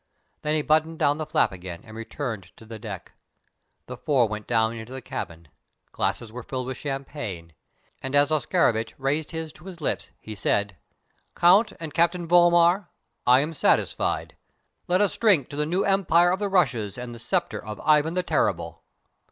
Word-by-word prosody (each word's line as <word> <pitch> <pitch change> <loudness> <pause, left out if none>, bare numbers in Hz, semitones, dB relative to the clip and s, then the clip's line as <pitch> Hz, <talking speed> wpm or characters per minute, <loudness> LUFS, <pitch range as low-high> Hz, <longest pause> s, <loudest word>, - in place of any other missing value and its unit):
Then 150 +1 0
he 155 - +1
buttoned 160 +1 +2
down 145 +1 +2
the 155 - -3
flap 155 - +2
again 90 -2 -8
and 110 -1 -12
returned 115 -4 -6
to 110 - -14
the 110 0 -9
deck. 100 -4 -8 0.7
The 125 - -7
four 130 -3 +2
went 105 0 -6
down 110 -1 +2
into 115 +2 -8
the 130 - -5
cabin: 85 - -6 0.4
glasses 115 -2 -2
were 125 +2 -7
filled 130 +1 -4
with 130 0 -5
champagne, 135 - -5 0.5
and 135 +1 -3
as 145 +2 +4
Oscarovitch 115 -6 +1
raised 140 +3 -1
his 160 -2 -5
to 170 - -16
his 185 -3 -9
lips, 150 - -2
he 110 - -8
said: 100 0 0 0.6
"Count 195 +5 +5
and 160 -2 -6
Captain 170 +1 +1
Vollmar, 175 +2 +5 0.4
I 125 +2 +7
am 155 +3 -3
satisfied. 150 - +1 0.5
Let 180 +2 +2
us 205 - +2
drink 190 - +3
to - - -7
the 150 +1 -1
New 180 +5 +1
Empire 175 -3 +4
of 185 - 0
the 205 -1 -1
Russias 125 - +1
and 125 -1 -6
the 115 - -10
sceptre 175 +8 -1
of 105 -1 -7
Ivan 155 +2 +3
the 180 - +1
Terrible!" - - -1
145 Hz, 180 wpm, -25 LUFS, 115-170 Hz, 0.7 s, I